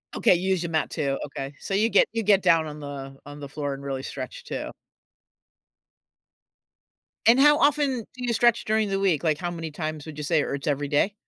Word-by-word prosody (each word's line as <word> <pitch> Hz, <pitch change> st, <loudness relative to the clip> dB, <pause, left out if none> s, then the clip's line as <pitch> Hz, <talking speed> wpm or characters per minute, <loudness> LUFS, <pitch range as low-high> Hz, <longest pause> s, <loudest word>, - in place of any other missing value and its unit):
Okay, -, -, +4 dB
you 185 Hz, +2 st, -2 dB
use 185 Hz, -2 st, +1 dB
your 170 Hz, -, -3 dB
mat 160 Hz, -2 st, 0 dB
too, 140 Hz, -4 st, -2 dB
okay. 140 Hz, -1 st, -6 dB
So 195 Hz, -, -5 dB
you 215 Hz, +3 st, +3 dB
get -, -, +4 dB
you 225 Hz, -1 st, -1 dB
get 200 Hz, -1 st, +4 dB
down 165 Hz, -1 st, +4 dB
on 150 Hz, 0 st, -8 dB
the 135 Hz, -1 st, -8 dB
on 145 Hz, +1 st, -10 dB
the 140 Hz, -1 st, -8 dB
floor 145 Hz, -1 st, -3 dB
and 135 Hz, -, -9 dB
really 135 Hz, -1 st, -4 dB
stretch -, -, -7 dB
too. -, -, -5 dB, 2.6 s
And 235 Hz, +3 st, +6 dB
how 295 Hz, +1 st, +6 dB
often 285 Hz, -4 st, +2 dB
do 250 Hz, -1 st, -9 dB
you 235 Hz, -, 0 dB
stretch 235 Hz, 0 st, +3 dB
during 215 Hz, -1 st, +1 dB
the 195 Hz, 0 st, 0 dB
week? 180 Hz, -6 st, +1 dB
Like, 155 Hz, -2 st, +2 dB
how 175 Hz, -1 st, -3 dB
many 165 Hz, -2 st, -6 dB
times 155 Hz, -1 st, -5 dB
would 155 Hz, -2 st, -9 dB
you 150 Hz, -, -4 dB
say, 155 Hz, 0 st, +2 dB
or -, -, -2 dB
it's 140 Hz, +2 st, -7 dB
every 145 Hz, 0 st, 0 dB
day? 150 Hz, +8 st, +1 dB
160 Hz, 225 wpm, -25 LUFS, 145-210 Hz, 2.6 s, And